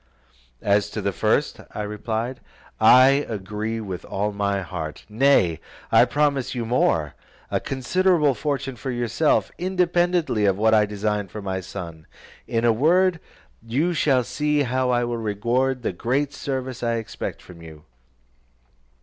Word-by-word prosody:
"As 100 Hz, 0 st, +2 dB
to -, -, -5 dB
the -, -, 0 dB
first," -, -, 0 dB, 0.2 s
I 105 Hz, -, -3 dB
replied, 110 Hz, +4 st, -3 dB, 0.4 s
"I 135 Hz, +3 st, +6 dB
agree 105 Hz, +2 st, -4 dB
with 95 Hz, -5 st, -6 dB
all 105 Hz, +2 st, -2 dB
my 100 Hz, -1 st, -1 dB
heart: 80 Hz, -4 st, -6 dB
nay, 105 Hz, -, +3 dB, 0.3 s
I 120 Hz, -, +6 dB
promise 140 Hz, -1 st, 0 dB
you 120 Hz, -2 st, -2 dB
more, 80 Hz, -, +1 dB, 0.4 s
a -, -, +1 dB
considerable 150 Hz, +3 st, +1 dB
fortune 135 Hz, -2 st, -3 dB
for 135 Hz, -, -5 dB
yourself, 120 Hz, +5 st, +1 dB
independently 175 Hz, -, +1 dB
of 95 Hz, -1 st, +2 dB
what 110 Hz, +1 st, +3 dB
I 105 Hz, -1 st, +4 dB
design 105 Hz, 0 st, -2 dB
for 105 Hz, +3 st, -8 dB
my 95 Hz, -1 st, -2 dB
son: 85 Hz, -4 st, -8 dB, 0.4 s
in 115 Hz, 0 st, 0 dB
a 115 Hz, -, +5 dB
word, 175 Hz, +8 st, +3 dB, 0.4 s
you 140 Hz, +10 st, 0 dB
shall 135 Hz, -5 st, +2 dB
see 150 Hz, +3 st, 0 dB
how 130 Hz, 0 st, 0 dB
I 120 Hz, -1 st, +2 dB
will 120 Hz, 0 st, -2 dB
reward 120 Hz, +4 st, -1 dB
the 100 Hz, -, -1 dB
great 135 Hz, +9 st, -1 dB
service 130 Hz, -2 st, -4 dB
I 115 Hz, -1 st, 0 dB
expect 115 Hz, -1 st, -5 dB
from 85 Hz, -2 st, -14 dB
you. 80 Hz, -2 st, -12 dB
120 Hz, 150 wpm, -23 LUFS, 105-140 Hz, 0.4 s, I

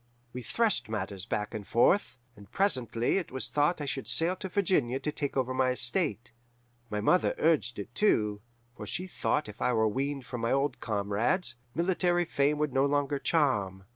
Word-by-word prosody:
We 125 Hz, -, -5 dB
threshed 200 Hz, -, 0 dB
matters 100 Hz, -3 st, -4 dB
back 105 Hz, +2 st, -2 dB
and 105 Hz, -3 st, -6 dB
forth, 130 Hz, -, +3 dB, 0.2 s
and 100 Hz, -2 st, -15 dB
presently 125 Hz, -, +1 dB
it 180 Hz, -, -7 dB
was 130 Hz, 0 st, -2 dB
thought 150 Hz, +4 st, +1 dB
I 145 Hz, -, -3 dB
should 135 Hz, -1 st, -4 dB
sail 170 Hz, +3 st, 0 dB
to 190 Hz, -, -6 dB
Virginia 160 Hz, -10 st, +1 dB
to 150 Hz, +2 st, -2 dB
take 145 Hz, -2 st, -3 dB
over 130 Hz, -1 st, 0 dB
my 130 Hz, 0 st, +2 dB
estate. 120 Hz, -, 0 dB, 0.6 s
My 105 Hz, -, -2 dB
mother 180 Hz, +12 st, +3 dB
urged 155 Hz, -8 st, +2 dB
it, 105 Hz, +3 st, -7 dB
too, 105 Hz, -, +2 dB, 0.3 s
for -, -, -8 dB
she 180 Hz, -, -1 dB
thought 155 Hz, -4 st, -1 dB
if 105 Hz, -, -11 dB
I 125 Hz, -, +2 dB
were 110 Hz, -1 st, +3 dB
weaned 135 Hz, +4 st, -2 dB
from 125 Hz, -2 st, -5 dB
my 115 Hz, -, 0 dB
old 135 Hz, 0 st, 0 dB
comrades, 105 Hz, -, 0 dB, 0.2 s
military 175 Hz, 0 st, +1 dB
fame 145 Hz, -1 st, +1 dB
would 150 Hz, -3 st, -1 dB
no 135 Hz, +1 st, +3 dB
longer 145 Hz, 0 st, 0 dB
charm. 105 Hz, -, +1 dB
135 Hz, 185 wpm, -29 LUFS, 115-160 Hz, 0.6 s, forth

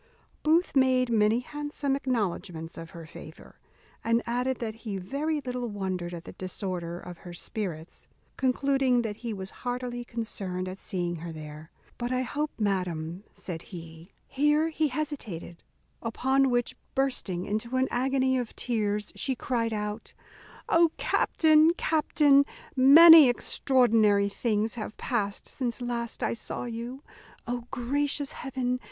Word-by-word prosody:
Booth 325 Hz, +2 st, +2 dB
made 255 Hz, -2 st, +3 dB
many 220 Hz, +1 st, +3 dB
handsome 290 Hz, 0 st, -2 dB
acknowledgments 190 Hz, -10 st, -2 dB
of 165 Hz, 0 st, -8 dB
her 165 Hz, -1 st, -10 dB
favour; -, -, -13 dB, 0.4 s
and 230 Hz, +1 st, +2 dB
added 250 Hz, +2 st, -1 dB
that 225 Hz, -2 st, -5 dB
he 210 Hz, -4 st, -4 dB
very 285 Hz, +11 st, -2 dB
little 250 Hz, -2 st, -3 dB
wondered 185 Hz, -4 st, -3 dB
at 170 Hz, -1 st, -7 dB
the -, -, -9 dB
disorder 180 Hz, -2 st, -4 dB
of 175 Hz, -1 st, -10 dB
her 175 Hz, -, -10 dB
spirits, 175 Hz, -4 st, -5 dB, 0.3 s
concluding 265 Hz, -1 st, +2 dB
that 210 Hz, -2 st, -4 dB
he 235 Hz, -1 st, -5 dB
was 190 Hz, -2 st, -6 dB
heartily 245 Hz, -1 st, -3 dB
concerned 195 Hz, -6 st, -4 dB
at 185 Hz, +1 st, -7 dB
seeing 175 Hz, -2 st, -3 dB
her 165 Hz, +1 st, -6 dB
there; 155 Hz, 0 st, -9 dB, 0.3 s
"but 240 Hz, 0 st, -2 dB
I 255 Hz, 0 st, +1 dB
hope, 295 Hz, +4 st, -2 dB
madam," 180 Hz, -3 st, -2 dB
said 165 Hz, -3 st, -5 dB
he 165 Hz, -1 st, -11 dB, 0.2 s
Here 295 Hz, +3 st, +2 dB
he 315 Hz, -1 st, +1 dB
hesitated; 255 Hz, -, -5 dB, 0.4 s
upon 265 Hz, +4 st, +2 dB
which, 245 Hz, -1 st, 0 dB, 0.2 s
bursting 245 Hz, -10 st, -1 dB
into 220 Hz, +4 st, -2 dB
an 260 Hz, 0 st, +2 dB
agony 260 Hz, +1 st, +1 dB
of 240 Hz, -3 st, -5 dB
tears, 210 Hz, -3 st, -1 dB
she 265 Hz, -, -1 dB
cried 235 Hz, -2 st, -1 dB
out, 210 Hz, +1 st, -4 dB, 0.5 s
"O 335 Hz, 0 st, +5 dB
captain! 315 Hz, +1 st, +4 dB
captain! 295 Hz, -3 st, +4 dB, 0.3 s
many 300 Hz, +2 st, +10 dB
extraordinary 225 Hz, -5 st, +3 dB
things 215 Hz, +1 st, 0 dB
have 215 Hz, -2 st, -6 dB
passed 205 Hz, -5 st, -2 dB
since 245 Hz, -2 st, -3 dB
last 240 Hz, -2 st, -3 dB
I -, -, +1 dB
saw 230 Hz, -, -4 dB
you. 240 Hz, +3 st, -6 dB, 0.4 s
O 245 Hz, -1 st, -3 dB
gracious 285 Hz, +3 st, -1 dB
heaven! 250 Hz, -2 st, -2 dB
235 Hz, 140 wpm, -28 LUFS, 195-265 Hz, 0.5 s, many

